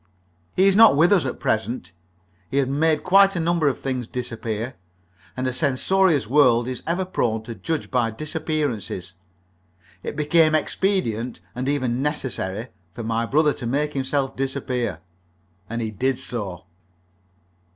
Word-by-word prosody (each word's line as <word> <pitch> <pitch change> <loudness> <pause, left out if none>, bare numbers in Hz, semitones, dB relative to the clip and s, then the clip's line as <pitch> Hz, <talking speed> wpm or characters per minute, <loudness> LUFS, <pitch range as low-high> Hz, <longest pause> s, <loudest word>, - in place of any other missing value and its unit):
He 190 +1 +5
is 195 - +4
not 225 -6 +8
with 170 +6 +5
us 175 -9 +3
at 130 - -5
present. 110 -4 -1 0.6
He 140 - -2
had 140 -2 +3
made 155 +3 +1
quite 195 +1 +5
a - - 0
number 165 -2 +1
of 135 - 0
things 130 -3 -3
disappear, 115 -1 -4 0.6
and 130 - -1
a 130 - -1
censorious 155 +4 +2
world 120 -2 +4
is 130 -1 -4
ever 175 +3 0
prone 110 -11 -1
to 115 +1 -7
judge 160 +7 -4
by 125 -3 +2
disappearances. 115 - -3 0.9
It - - -5
became 155 +1 +3
expedient 130 - -1
and 130 +2 -2
even 130 -3 0
necessary 130 -7 -2 0.3
for 115 - -5
my 115 +1 -1
brother 150 +2 +3
to 120 - -6
make 150 +4 0
himself 135 0 -1
disappear, 130 - -2 0.7
and 115 +1 -3
he 110 - -3
did 130 +5 0
so. 95 -8 -4
130 Hz, 150 wpm, -23 LUFS, 115-155 Hz, 0.9 s, not